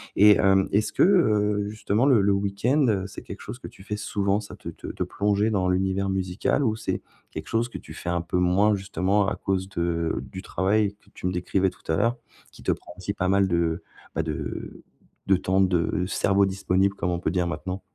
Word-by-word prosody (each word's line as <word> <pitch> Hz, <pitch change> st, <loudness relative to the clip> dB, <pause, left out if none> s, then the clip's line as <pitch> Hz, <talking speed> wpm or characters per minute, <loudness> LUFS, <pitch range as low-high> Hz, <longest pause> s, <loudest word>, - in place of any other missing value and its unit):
et 105 Hz, 0 st, +7 dB
hem, 95 Hz, 0 st, +3 dB
est-ce 105 Hz, +2 st, +1 dB
que, -, -, 0 dB
heu, 105 Hz, -, +3 dB
justement, 110 Hz, +3 st, 0 dB
le 130 Hz, -7 st, +5 dB
le 100 Hz, +1 st, +3 dB
week-end, 100 Hz, +9 st, +1 dB
heu, 95 Hz, -3 st, +1 dB
c'est 100 Hz, -, -10 dB
quelque 100 Hz, -, -9 dB
chose 110 Hz, +3 st, -7 dB
que -, -, -8 dB
tu -, -, -15 dB
fais 105 Hz, +1 st, -4 dB
souvent, 100 Hz, 0 st, 0 dB
ça, 105 Hz, -, -10 dB
te -, -, -8 dB
te -, -, -11 dB
te -, -, -3 dB
plonger 105 Hz, +1 st, +1 dB
dans 95 Hz, -4 st, +1 dB
l'univers 95 Hz, +1 st, 0 dB
musical 95 Hz, +8 st, 0 dB
ou 110 Hz, -4 st, +1 dB
c'est 110 Hz, -, -3 dB, 0.3 s
quelque 80 Hz, -, -7 dB
chose 115 Hz, +1 st, +1 dB
que -, -, -7 dB
tu -, -, -11 dB
fais 85 Hz, -, -5 dB
un 85 Hz, -1 st, 0 dB
peu 85 Hz, +2 st, -2 dB
moins, 95 Hz, +4 st, +3 dB
justement, 100 Hz, 0 st, 0 dB
à -, -, -1 dB
cause 95 Hz, -1 st, -2 dB
de 85 Hz, -2 st, -1 dB
du 95 Hz, +1 st, -9 dB
travail 100 Hz, +2 st, +1 dB
que -, -, -24 dB
tu -, -, -8 dB
me 90 Hz, -, 0 dB
décrivais 95 Hz, +1 st, 0 dB
tout -, -, -22 dB
à -, -, +2 dB
l'heure, 115 Hz, +7 st, +2 dB, 0.4 s
qui -, -, -15 dB
te -, -, +2 dB
prend 85 Hz, -, -6 dB
aussi 95 Hz, +2 st, -3 dB
pas 95 Hz, -2 st, -1 dB
mal 100 Hz, 0 st, +3 dB
de, 85 Hz, -2 st, 0 dB, 0.3 s
bah, -, -, -2 dB
de 80 Hz, -2 st, -5 dB, 0.4 s
de 95 Hz, -, +5 dB
temps 95 Hz, +1 st, +1 dB
de 90 Hz, +1 st, +1 dB
cerveau 100 Hz, 0 st, +2 dB
disponible, 95 Hz, 0 st, +1 dB
comme 90 Hz, -2 st, -1 dB
on 85 Hz, -, -1 dB
peut 80 Hz, -, -1 dB
dire 90 Hz, -1 st, 0 dB
maintenant? 90 Hz, +4 st, -4 dB
95 Hz, 225 wpm, -25 LUFS, 90-105 Hz, 0.4 s, et